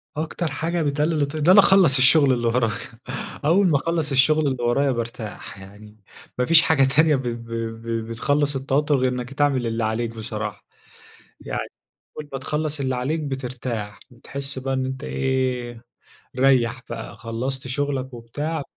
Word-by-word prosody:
أكتر 160 +1 -3
حاجة 165 +6 -1
بتقلل 150 +1 0
الت 140 +1 -1
إن 155 +2 +1
أنا 190 +3 +9
أخلص 190 -8 +6
الشغل 135 +1 +5
اللي 120 -1 0
ورايا، 115 -1 +2 0.7
أول 185 +6 +4
ما 155 -5 +3
أخلص 160 0 -1
الشغل 150 +3 +4
اللي 130 -3 -2
ورايا 135 +4 +2
بارتاح 115 -4 -6
يعني، 105 +2 -14 0.4
ما 125 - +1
فيش 165 +3 +7
حاجة 155 -4 +3
تانية 150 +3 +4
ب 135 - -2
ب 115 -1 -5 0.3
ب 115 -1 -3
بتخلص 145 +5 0
التوتر 140 +2 +1
غير 130 -1 +1
إنك 125 +1 -5
تعمل 135 -4 +1
اللي 115 0 -2
عليك 110 +2 -1
بصراحة. 110 -2 -5 0.8
يعني - - -4 0.6
أول 150 -1 -7
ما 135 - -3
تخلص 150 +2 -2
اللي 130 -1 0
عليك 140 +6 -1
بترتاح، 125 -6 -5
بتحس 135 +3 -6
بقى 135 +1 -2
إن 130 0 -1
أنت 130 +2 -5
إيه، 125 -3 -2 0.6
ريّح 130 -2 +3
بقى 115 -1 -6
خلصت 130 +3 -4
شغلك 135 -1 -2
وبتاع 145 +7 -4
130 Hz, 160 wpm, -23 LUFS, 120-145 Hz, 0.8 s, أنا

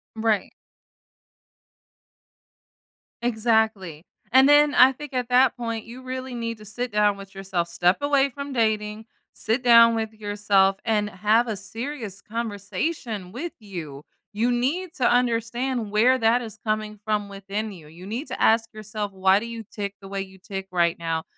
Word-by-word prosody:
Right. 220 -3 0 2.7
Exactly. 220 -8 0 0.3
And 265 +2 +7
then 290 0 +5
I 255 +1 +8
think 285 +1 -10
at 250 -1 -2
that 250 0 +4
point, 230 -2 -4
you 245 +3 -10
really 255 0 -5
need 230 -1 -3
to 215 - -13
sit 240 +4 -4
down 210 -1 +2
with 195 -1 -11
yourself. 190 -3 -2
Step 175 +2 +2
away 285 -1 +3
from 280 +1 -7
dating, 220 -2 0 0.3
sit 225 +4 -1
down 230 -1 +7
with 220 -1 -3
yourself, 205 -2 +2
and 210 -2 +1
have 215 +5 +2
a 220 - -2
serious 220 0 -6
conversation 210 - -4
with 310 - -5
you. 165 -9 -8 0.3
You 230 +4 +1
need 305 +9 -1
to 250 - +3
understand 240 0 0
where 240 +5 +4
that 230 +2 +3
is 220 -2 -9
coming 215 -1 -2
from 210 -1 -1
within 200 +2 -4
you. 165 -6 -12
You 170 +4 -12
need 235 +9 -4
to 260 - -6
ask 225 0 +3
yourself 215 -1 -5
why 190 +1 +4
do 230 - -6
you 230 -1 -7
tick 200 -1 -5
the 195 - -10
way 195 0 -3
you 190 0 -10
tick 195 0 -7
right 170 -2 +2
now, 165 -1 -2
220 Hz, 165 wpm, -24 LUFS, 200-245 Hz, 2.7 s, I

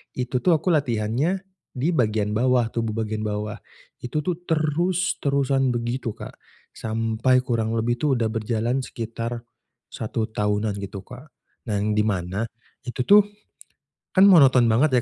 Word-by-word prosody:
itu 125 0 -1
tuh 175 +3 +3
aku 165 +4 0
latihannya, 140 - 0 0.3
di 140 +7 0
bagian 110 -8 +1
bawah 120 +1 +2
tubuh 115 -2 -2
bagian 110 0 -3
bawah. 105 0 -3 0.4
Itu 150 +5 -3
tuh, 175 +1 -2
terus-terusan 150 -5 +1
begitu 120 -1 -3
Kak. 110 -2 -10 0.3
Sampai 115 +3 0
kurang 115 -2 -1
lebih 120 +1 0
itu 145 -1 +2
udah 115 -2 +1
berjalan 115 +3 -1
sekitar, 115 -1 -5 0.5
1 110 0 -3
tahunan 105 0 0
gitu 100 -1 -7
Kak. 125 +7 -12 0.4
Nah, 105 -2 0
di 105 0 +1
mana 95 +1 -2 0.4
itu 125 +1 -2
tuh, 205 +6 +6 0.9
kan 195 +2 +7
monoton 130 -9 +6
banget 130 +6 +3
120 Hz, 135 wpm, -24 LUFS, 110-140 Hz, 0.9 s, kan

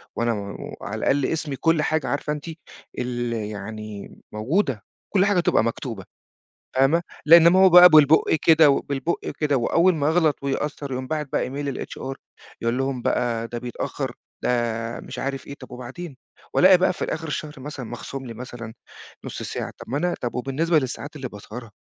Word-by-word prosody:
وأنا 120 0 +1
و 100 -2 -6
على - - -5
الأقل 140 -1 +2
اسمي 155 -2 -2
كل 165 +3 +2
حاجه، 155 -1 0
عارفة 145 +1 -1
أنتِ 150 -1 -7 0.5
ال 120 -1 -2
يعني 105 -1 -6 0.2
موجودة، 125 - 0 0.3
كل 195 -1 +4
حاجه 200 -2 +3
تبقى 170 - +3
مكتوبة، 115 -3 -4 0.7
فاهمة؟ 135 +6 +4 0.2
لأن 165 +1 +9
ما 180 +2 +4
هو 190 - +8
بقى 180 0 +10
بالبُقّ 155 -1 +5
كده، 160 -2 +6
وبالبُقّ 140 +3 -2
كده، 145 -2 +2
وأوّل 170 +9 +3
ما 145 -2 0
أغلط، 160 -3 +2
ويأثّر، 140 0 -3
يقوم 130 0 -3
باعت 150 +1 -2
بقى - - +1
إيميل 140 0 -4
للHR 135 - -6 0.5
يقول 115 +2 0
لهم 135 -2 -2
بقى، 115 -1 0
ده 120 - -5
بيتأخر، 120 0 -4 0.3
ده - - +1 0.5
مش - - -9
عارف 135 -1 -4
إيه، 140 - -7
طَب 130 -2 -13
وبعدين؟! 130 +5 -8 0.4
وألاقي 185 0 +7
بقى 185 - +3
في - - -7
الآخر 160 0 -3
الشهر 150 0 -4
مثلًا، 135 -2 -7
مخصوم 130 +3 -7
لي 115 - -7
مثلًا، 120 -2 -8 0.5
نُص - - -6
ساعة، - - -5
طَب - - -11
ما 140 - 0
أنا 175 +3 0
طَب 120 - -3
وبالنسبة 150 +6 +1
للساعات 145 +2 -4
اللي 135 -3 -5
باسهرها! 110 +3 -10
135 Hz, 175 wpm, -23 LUFS, 120-160 Hz, 0.7 s, بقى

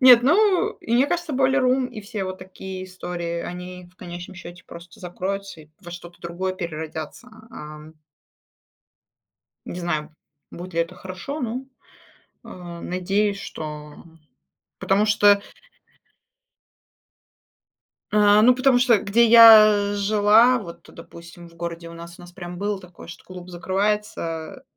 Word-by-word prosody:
Нет, 250 -2 +8
ну, 375 - +3
и 225 - -5
мне 255 +3 +4
кажется, 345 -1 -3
Boiler 265 +1 +2
Room 255 0 +1
и 240 -4 -9
все 205 -1 -5
вот 185 0 -6
такие 185 0 -8
истории, 175 -2 -5
они, 180 0 -8
в 185 - -34
конечном 175 +1 -9
счете, 175 0 -12
просто 170 +1 -13
закроются 190 0 -5
и 150 - -22
во 175 - -11
что-то 175 0 -11
другое 180 +2 -4
переродятся. 160 +4 -7 0.2
Ам. 150 -5 -11 1.7
Не 175 - -7
знаю, 155 -3 -3 0.4
будет 180 +1 -9
ли 170 - -1
это 170 +2 -6
хорошо, 190 +11 -7
ну, 255 +2 -5 0.7
а, 175 -2 -10
надеюсь, 195 +3 -1
что, 150 -4 -8 0.8
потому 200 +2 +2
что 205 -1 +4 2.7
А, 210 0 +5
ну, 250 +3 +6
потому 255 0 +3
что 240 -4 +4
где 215 +4 +3
я 215 -3 +8
жила, 215 +4 +4
вот, 170 -6 -11
допустим, 170 +1 -13
в 170 - -21
городе 170 0 -6
у 170 - -11
нас, 170 +1 -11
у - - -11
нас 175 0 -13
прям 175 -1 -9
было 205 +1 -2
такое, 180 -3 -14
что 170 - -11
клуб 180 -1 -11
закрывается, 190 +1 -3
185 Hz, 140 wpm, -23 LUFS, 170-215 Hz, 2.7 s, Нет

